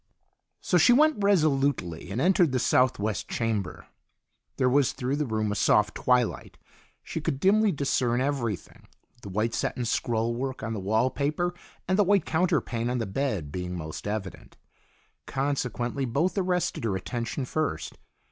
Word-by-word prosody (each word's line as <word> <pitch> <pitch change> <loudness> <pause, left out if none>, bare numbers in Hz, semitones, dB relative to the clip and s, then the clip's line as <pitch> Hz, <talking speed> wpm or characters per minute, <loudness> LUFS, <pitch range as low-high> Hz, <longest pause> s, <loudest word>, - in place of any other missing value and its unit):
So 180 - +2
she 205 +9 +6
went 300 -4 +3
resolutely 140 - +1
and 100 +5 -3
entered 175 -2 +3
the - - +2
southwest 110 -5 +1
chamber. 110 -5 -2 0.7
There 130 - +2
was 135 +1 +3
through 135 +1 -2
the 150 -2 -1
room 110 -2 -1
a - - -2
soft 105 +1 +3
twilight. 125 -2 0 0.5
She - - -5
could 135 - -2
dimly 205 +5 +4
discern 130 -5 0
everything, 130 -7 -3 0.3
the 100 - -8
white 110 +4 -1
satin 125 - -2
scroll 115 0 0
work 130 0 -4
on 115 +1 -3
the 110 - -3
wall 110 +6 +1
paper 155 +5 -1 0.3
and 185 +2 +1
the - - +7
white 200 0 +3
counterpane 135 -8 0
on 125 - -1
the 115 - -1
bed 100 - -2
being 90 +1 -4
most 80 +3 -6
evident. 105 -3 -5 0.7
Consequently 135 -1 -2
both 145 +10 0
arrested 180 - 0
her 105 -4 0
attention 120 +6 -3
first. 155 +4 -2
125 Hz, 155 wpm, -27 LUFS, 110-150 Hz, 0.7 s, the